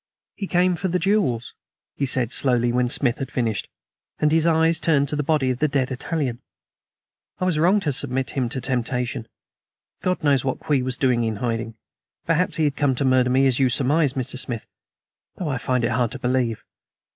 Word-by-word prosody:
"He 195 - -5
came 180 0 +2
for 185 +3 -2
the 180 0 0
jewels," 180 - 0 0.4
he 140 - -1
said 125 -2 +1
slowly, 120 -3 +2
when 125 0 +1
Smith 130 -3 +1
was 135 - -4
finished; 115 -5 -2 0.5
and 150 - +2
his 160 +1 +3
eyes 160 0 +3
turned 145 -4 +2
to 150 - -2
the 150 - 0
body 145 -3 +1
of 125 - -4
the 155 - +2
dead 135 -2 0
Italian. 130 -2 -3 1.0
"I 185 - -2
was 175 -4 +1
wrong 185 +6 +4
to 150 -5 -1
submit 130 0 -2
him 130 -4 -1
to 130 - -1
the 125 - -6
temptation. 125 -2 -2 0.7
God 185 -3 -1
knows 140 -4 +3
what 130 -1 -2
Kwee 145 -3 0
was 130 0 -3
doing 125 -3 +2
in 110 -1 -1
hiding. 115 0 -3 0.5
Perhaps 165 +2 +1
he 160 - +1
had 145 -2 +1
come 140 -3 +1
to 135 - -1
murder 130 -1 +3
me, 130 +2 +3
as 130 -1 +2
you 130 -2 +3
surmise, 140 +3 +2
Mr. 130 -1 -2
Smith, 120 -3 -4 0.7
though 175 -5 -4
I 135 -3 -2
find 125 -1 0
it 115 - +1
hard 120 0 +1
to - - -5
believe. 125 -3 -1
130 Hz, 205 wpm, -23 LUFS, 125-155 Hz, 1.0 s, wrong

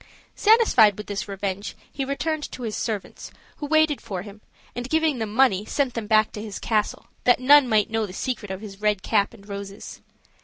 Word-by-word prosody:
Satisfied 410 - +5
with 210 - -7
this 205 -1 -4
revenge, 200 0 -4 0.2
he 280 - -2
returned 295 +3 -2
to 250 - -8
his 220 -2 -3
servants, 215 -4 -4 0.3
who 295 - -5
waited 315 -1 +2
for 185 -2 -5
him, 205 0 -12 0.3
and 245 +2 -5
giving 315 -4 +1
them 220 -2 -3
money, 215 -4 +3
sent 260 +3 -1
them 230 -3 -4
back 215 0 +3
to 210 - -7
his 210 -2 -6
castle, 215 -2 -1 0.2
that 245 - +4
none 275 0 +6
might 215 -1 +2
know 225 -1 0
the - - -9
secret 215 +1 -4
of 190 +1 -5
his 200 -2 -10
red 210 -3 +1
cap 205 -3 +1
and 200 -3 -16
roses. 200 0 -8
220 Hz, 200 wpm, -24 LUFS, 205-265 Hz, 0.3 s, none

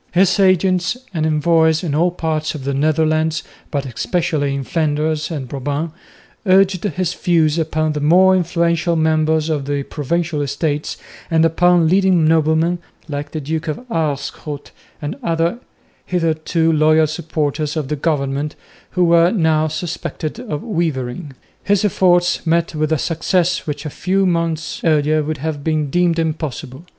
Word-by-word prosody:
His 190 +2 +3
agents 185 +1 +2 0.2
and 160 -2 0
envoys 160 +1 +2
in 160 -5 -2
all 170 +4 +3
parts 160 -3 -2
of 145 - -7
the 140 +1 -2
Netherlands, 155 +2 +1 0.3
but 140 -2 -2
especially 145 +3 -1
in 140 - -3
Flanders 155 +1 -1
and 145 -6 -4
Brabant, 145 +5 -3 0.6
urged 190 -1 +4
his 185 -3 -1
views 165 -2 +2
upon 155 -1 0
the 150 - -2
more 185 +5 +5
influential 170 -1 +1
members 155 -1 +2
of 150 -4 -1
the 140 0 -2
provincial 160 +2 -2
estates 145 +1 -2 0.3
and 165 0 +3
upon 175 0 +3
leading 185 -2 +3
noblemen, 160 +2 +2 0.3
like 145 -1 -4
the 155 - -4
Duke 155 +2 -3
of 155 +11 -4
Aerschot 145 -2 -3 0.3
and 145 - -4
other 165 +6 0 0.5
hitherto 165 -1 +1
loyal 155 +1 +4
supporters 150 0 -2
of 150 -4 -2
the 150 - -2
government, 145 -1 -1 0.4
who 180 - +4
were 170 0 +5
now 160 -6 +2
suspected 155 - -4
of 210 -12 -5
wavering. 155 - -3 0.3
His 205 0 +2
efforts 180 -2 +2
met 170 0 +1
with 155 0 -1
a 160 - +3
success 170 +3 0
which 150 +1 -4
a 150 - -4
few 190 +5 0
months 165 -3 -1
earlier 155 -1 +2
would 155 +1 -3
have 150 0 -4
been 155 -3 -1
deemed 175 0 +2
impossible. 155 -2 -4
160 Hz, 150 wpm, -18 LUFS, 150-170 Hz, 0.6 s, more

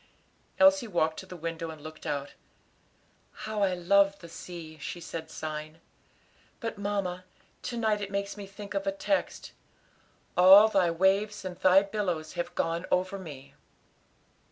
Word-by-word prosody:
Elsie 285 -3 +5
walked 160 -5 0
to 190 - -10
the 185 - -9
window 165 0 -4
and 160 -1 -9
looked 155 +2 -9
out. 145 -1 -3 1.1
"How 215 -1 -3
I 190 -2 +2
love 200 +3 +3
the 170 - -12
sea," 160 -2 -9
she 175 - -6
said, 165 -1 -7
sighing, 155 +1 -6 0.8
"but, 225 -4 -5
mamma, 195 -3 -2 0.4
to 240 - -4
night 215 -2 +1
it 200 - -4
makes 200 0 -3
me 205 -2 -8
think 200 +1 -9
of 195 0 -2
a - - +3
text 290 +9 -2 0.8
'All 195 +4 +9
Thy 190 -5 +3
waves 195 +4 +1
and 180 -1 -4
Thy 185 +1 +6
billows 185 -6 -3
have 175 - -4
gone 165 +2 -1
over 185 +2 0
me.'" 145 -7 -10
185 Hz, 155 wpm, -29 LUFS, 165-200 Hz, 1.1 s, All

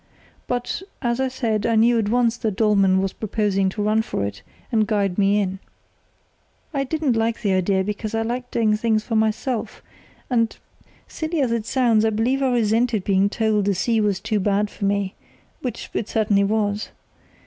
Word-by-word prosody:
But, 245 +7 -2 0.2
as 240 0 0
I 265 - +1
said 230 -4 -1
I 230 - +2
knew 230 +1 +4
at 210 -2 0
once 235 0 +2
that 220 -4 -2
Dollmann 195 -3 +3
was 195 - -2
proposing 205 -3 0
to 205 +2 -3
run 215 +1 +2
for 220 - -3
it 100 -1 -6 0.3
and 220 -3 +2
guide 200 -3 0
me 200 +1 +3
in. 190 -1 -2 1.1
"I 275 -1 0
didn't 295 -3 0
like 225 +1 -1
the 200 -2 +2
idea, 190 +1 +1
because 210 +2 -4
I 225 - 0
like 245 +2 -3
doing 220 -2 +2
things 220 0 +1
for 225 - -3
myself, 220 +2 -1 0.4
and, 230 -3 0 0.5
silly 320 0 -3
as 260 -4 +1
it 230 -1 -1
sounds, 235 -5 +3
I 225 - +3
believe 235 +5 0
I 265 - +2
resented 230 -2 +1
being 195 0 +2
told 215 -1 +1
the 200 -1 +1
sea 225 +5 +1
was 205 -3 +1
too 215 +2 -1
bad 205 +1 +1
for 200 - -4
me, 200 -1 0 0.5
which 250 - -5
it 215 - -2
certainly 205 -2 +2
was. 210 0 -1
220 Hz, 185 wpm, -22 LUFS, 200-235 Hz, 1.1 s, knew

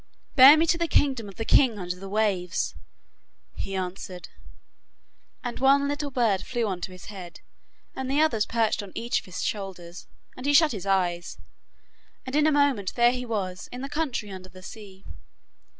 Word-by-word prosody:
'Bear 275 +4 +10
me 320 - +3
to 335 +1 +1
the 340 - +1
kingdom 260 -8 +1
of 195 - -12
the 225 - -4
king 245 -4 +4
under 180 -2 -4
the 195 +2 -9
waves,' 200 -4 0 0.8
he 195 - -5
answered, 185 -1 -5 1.1
and 245 -1 -5
one 275 +1 +4
little 290 0 -2
bird 230 -8 +1
flew 240 -2 -2
on 185 -4 -3
to 185 - -5
his 185 -1 -12
head, 180 -3 -10 0.5
and 265 0 -4
the 280 +2 +1
others 240 -9 +2
perched 225 -2 +1
on 200 -2 -10
each 235 +1 -1
of - - -16
his 185 -1 -5
shoulders, 180 -4 -5 0.3
and 255 +2 -6
he 290 - +3
shut 320 0 +6
his 200 -4 -6
eyes, 180 -3 0 0.9
and 260 +1 -5
in 300 +1 +4
a - - +4
moment 280 -10 +1
there 240 0 +5
he 250 0 -5
was 185 -5 -4
in 250 - -7
the 275 - -4
country 275 -9 -3
under 185 -1 -9
the 185 +1 -14
sea. 195 -2 -11
220 Hz, 185 wpm, -26 LUFS, 185-265 Hz, 1.1 s, Bear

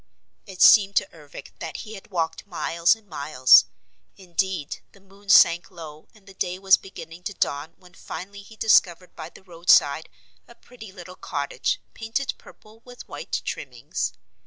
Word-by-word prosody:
It 190 -2 0
seemed 200 -3 +7
to - - +2
Ervic 150 -3 -12
that - - -6
he 220 - -10
had 195 - -12
walked 165 -1 -3
miles 170 -1 +1
and 220 -2 -23
miles. 140 -6 +5 0.5
Indeed 185 -4 -3
the 200 - -20
moon 195 +1 -20
sank 170 -2 +6
low 155 -4 -12
and 210 -2 -22
day 180 +1 -2
was 190 0 +5
beginning 170 -3 -11
to 205 - -5
dawn 145 +1 -2
when 180 -1 -20
finally 200 +2 -9
he 220 +3 -16
discovered 185 -5 +2
by 160 0 -8
the - - -18
roadside 165 -4 +2 0.4
a 235 - -16
pretty 225 -5 -14
little 180 -1 -11
cottage, 145 -6 -3
painted 230 +4 -3
purple 215 +1 -18
with 245 0 -13
white - - -5
trimmings. - - -5
185 Hz, 160 wpm, -24 LUFS, 165-200 Hz, 0.5 s, seemed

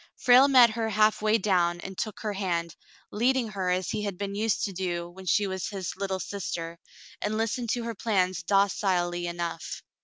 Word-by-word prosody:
Frale 255 +2 +6
met 250 -4 +7
her 225 0 -2
halfway 215 +1 +3
down 180 -4 +1
and 195 0 -7
took 215 +2 -4
her 215 -2 -2
hand, 170 -4 -2 0.4
leading 245 +2 +1
her 190 -3 -2
as 180 0 0
he 215 - -2
had 200 -3 -4
been 200 0 -4
used 215 +1 0
to 195 - -2
do 175 -2 -3
when 185 +2 -12
she 205 +4 +3
was 190 -1 -3
his 190 -3 -5
"little 190 -1 -3
sister," 170 -4 -5 0.4
and 215 +1 -1
listened 230 +2 -1
to 240 +1 -1
her 230 0 -3
plans 185 -4 0
docilely 180 -2 +1
enough. 170 -1 -5
195 Hz, 185 wpm, -27 LUFS, 180-215 Hz, 0.4 s, met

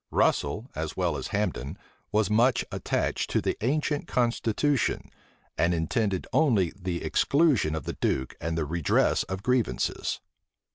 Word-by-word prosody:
Russel, 105 - +1
as 80 0 -4
well 90 -4 +1
as 70 - -4
Hambden, 70 +9 -2 0.3
was 110 -1 +2
much 120 +4 +3
attached - - -1
to - - +2
the - - -1
ancient 145 +3 0
constitution, 120 +3 0 0.5
and 85 +1 +3
intended 95 +4 0
only 110 - +3
the 90 -3 -4
exclusion 140 - +2
of 80 - -4
the - - -4
duke 65 0 0
and 80 +1 -2
the 80 - 0
redress 80 +1 +2
of 95 +1 -5
grievances. 125 -3 0
100 Hz, 140 wpm, -27 LUFS, 80-125 Hz, 0.5 s, much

